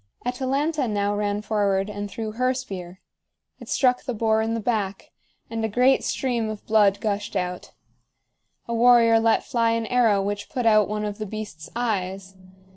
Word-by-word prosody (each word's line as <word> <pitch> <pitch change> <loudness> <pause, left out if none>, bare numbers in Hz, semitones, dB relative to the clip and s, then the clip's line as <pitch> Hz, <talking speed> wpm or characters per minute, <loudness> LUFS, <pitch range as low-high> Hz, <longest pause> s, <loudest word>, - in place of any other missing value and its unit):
Atalanta 270 +3 -1
now 205 -1 0
ran 205 0 -1
forward 200 -3 0
and 205 -1 -5
threw 220 +1 -5
her 255 +3 0
spear. 185 -6 -7 0.6
It - - -11
struck 250 -2 +2
the 250 -3 -4
boar 220 0 +2
in 225 +1 -1
the - - -2
back, 205 -4 -2 0.4
and 225 0 -4
a 220 - 0
great 250 +5 +3
stream 240 -4 -1
of 215 -1 -7
blood 205 -2 +3
gushed 205 -1 -3
out. 180 -1 -3 0.9
A 235 - -3
warrior 230 -1 +5
let 225 0 +2
fly 230 -1 +1
an 230 0 -1
arrow 225 -4 +3
which 205 +1 -3
put 250 -5 -3
out 215 -2 +5
one 210 0 -2
of 205 0 -5
the 215 - -4
beast's 205 -7 -7
eyes. 195 -5 -3
215 Hz, 175 wpm, -24 LUFS, 205-235 Hz, 0.9 s, warrior